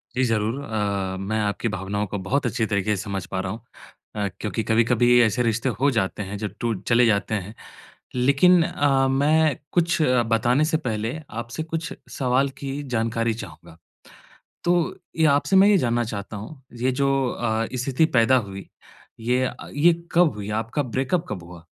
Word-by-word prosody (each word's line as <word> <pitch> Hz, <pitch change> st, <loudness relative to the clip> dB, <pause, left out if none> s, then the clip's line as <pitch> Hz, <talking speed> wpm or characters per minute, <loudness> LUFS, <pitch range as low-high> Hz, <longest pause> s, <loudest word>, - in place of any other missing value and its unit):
जी 130 Hz, -, +2 dB
ज़रूर। 115 Hz, +2 st, 0 dB
अ, 100 Hz, -5 st, -2 dB
मैं 110 Hz, +3 st, -2 dB
आपकी 105 Hz, +3 st, -1 dB
भावनाओं 100 Hz, +2 st, -2 dB
को 100 Hz, -, -4 dB
बहुत 135 Hz, +7 st, 0 dB
अच्छी 115 Hz, -1 st, 0 dB
तरीके 105 Hz, 0 st, 0 dB
से 95 Hz, -, -4 dB
समझ 95 Hz, -3 st, -4 dB
पा 95 Hz, -1 st, -4 dB
रहा 95 Hz, 0 st, -3 dB
हूँ। 110 Hz, +2 st, -7 dB, 0.5 s
अ, 100 Hz, -1 st, -1 dB
क्योंकि 110 Hz, +1 st, -2 dB
कभी-कभी 120 Hz, +2 st, +3 dB
ऐसे 115 Hz, +3 st, +1 dB
रिश्ते 115 Hz, +3 st, 0 dB
हो 140 Hz, +2 st, +4 dB
जाते 100 Hz, 0 st, -1 dB
हैं, 100 Hz, -, -5 dB
जो 105 Hz, -, -3 dB
टू 115 Hz, -1 st, 0 dB, 0.2 s
चले 120 Hz, +1 st, +5 dB
जाते 110 Hz, 0 st, +1 dB
हैं। 100 Hz, +1 st, -5 dB, 0.6 s
लेकिन 140 Hz, +8 st, +5 dB
अ, 135 Hz, -3 st, +2 dB
मैं 150 Hz, +2 st, +3 dB, 0.2 s
कुछ 175 Hz, 0 st, +2 dB
बताने 120 Hz, +1 st, +2 dB
से 160 Hz, 0 st, +1 dB
पहले, 115 Hz, 0 st, -3 dB
आपसे 115 Hz, +7 st, -5 dB
कुछ 165 Hz, 0 st, -4 dB, 0.2 s
सवाल 130 Hz, +1 st, +1 dB
की 135 Hz, -1 st, -4 dB, 0.2 s
जानकारी 115 Hz, 0 st, 0 dB
चाहूँगा। 80 Hz, -2 st, -13 dB, 0.9 s
तो 175 Hz, +1 st, +3 dB, 0.4 s
ये 160 Hz, -1 st, +4 dB
आपसे 190 Hz, +6 st, +1 dB
मैं 195 Hz, +2 st, +7 dB
ये 205 Hz, -, +5 dB
जानना 120 Hz, -4 st, +1 dB
चाहता 105 Hz, -1 st, -6 dB
हूँ, 130 Hz, +7 st, -9 dB, 0.2 s
ये 130 Hz, 0 st, +2 dB
जो 140 Hz, -, +3 dB, 0.2 s
अ, 115 Hz, -1 st, -1 dB
स्थिति 130 Hz, +5 st, +1 dB
पैदा 130 Hz, +3 st, +5 dB
हुई, 95 Hz, 0 st, -9 dB, 0.5 s
ये 125 Hz, +3 st, +1 dB
अ, -, -, -5 dB, 0.2 s
ये 165 Hz, +5 st, +4 dB, 0.2 s
कब 170 Hz, -7 st, +4 dB
हुई? 105 Hz, 0 st, -6 dB
आपका 130 Hz, +6 st, -2 dB
ब्रेकअप 135 Hz, +7 st, -1 dB
कब 95 Hz, -5 st, -4 dB
हुआ? 85 Hz, -1 st, -13 dB
115 Hz, 175 wpm, -23 LUFS, 105-135 Hz, 0.9 s, मैं